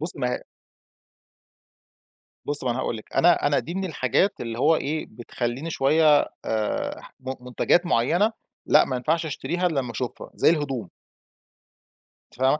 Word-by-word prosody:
بُصّي 160 -1 +1
ما 125 -1 0 2.1
بُصّي، 145 -2 -1
ما 125 - +2
هو - - -1
أنا 130 - -3
هاقول 115 - -2
لِك، 110 - -13
أنا 175 -3 +4
أنا 145 -1 +2
دي 170 - -6
من 190 0 -1
الحاجات 180 - 0
اللي 115 -1 -5
هو 160 +5 +4
إيه 155 +1 -2
بتخلّيني 120 +5 -4
شويّة 155 0 +4 0.2
آآ 110 -1 -2 0.2
م 130 0 -4
مُنتجَات 145 +8 +2
معيّنة، 175 - +2 0.3
لأ - - +5
ما 130 - -2
ينفَعش 160 +6 0
أشتريها 175 +4 -1
إلأ 155 -5 0
لمّا 125 -3 -4
أشوفها 120 +2 -5
زي - - +4
الهدوم. 135 - -1 1.4
فاهمة، 130 +4 +2
140 Hz, 155 wpm, -24 LUFS, 125-165 Hz, 2.1 s, لأ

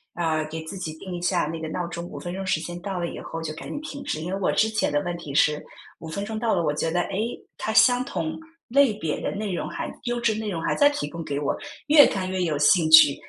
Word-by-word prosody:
呃， 160 -2 0
给 160 +1 -6
自 175 +5 -7
己 160 -4 -4
定 185 0 -7
一 175 - -5
下 175 -1 +1
那 165 +1 -4
个 160 - -4
闹 175 +2 -3
钟， 170 0 -6
5 - - -8
分 175 - -5
钟 195 +1 -4
时 185 - +1
间 175 +1 -6
到 190 -2 -3
了 170 - -1
以 - - -7
后 165 0 -6
就 155 -1 -4
赶 - - -8
紧 290 - -4
停 285 -2 -7
止。 155 - -3
因 175 +3 -4
为 195 - -2
我 - - +2
之 220 - +3
前 220 -8 0
的 145 0 +1
问 175 -1 -3
题 150 -5 -8
是 150 +1 +3 0.4
5 165 - -8
分 200 +5 -3
钟 220 +1 -4
到 225 -3 +1
了， 170 - +1
我 150 - +1
觉 160 +2 -1
得， 175 +1 +2
诶， 220 +5 -3 0.2
它 220 - -2
相 245 +2 +5
同 160 - -3 0.3
类 265 -2 +4
别 160 -7 -2
的 - - -2
内 200 -2 -3
容 - - -2
还 - - -4
优 240 0 -1
质 235 -2 +1
内 220 -1 -3
容 170 -4 -3
还 - - +1
在 285 - +6
提 145 - -3
供 170 +2 -6
给 145 -2 -3
我， 145 - 0 0.3
越 295 -1 +9
看 185 -2 -2
越 185 -1 -1
有 155 -3 0
兴 160 +2 +4
趣 155 -3 +9
175 Hz, 300 characters per minute, -25 LUFS, 160-215 Hz, 0.4 s, 越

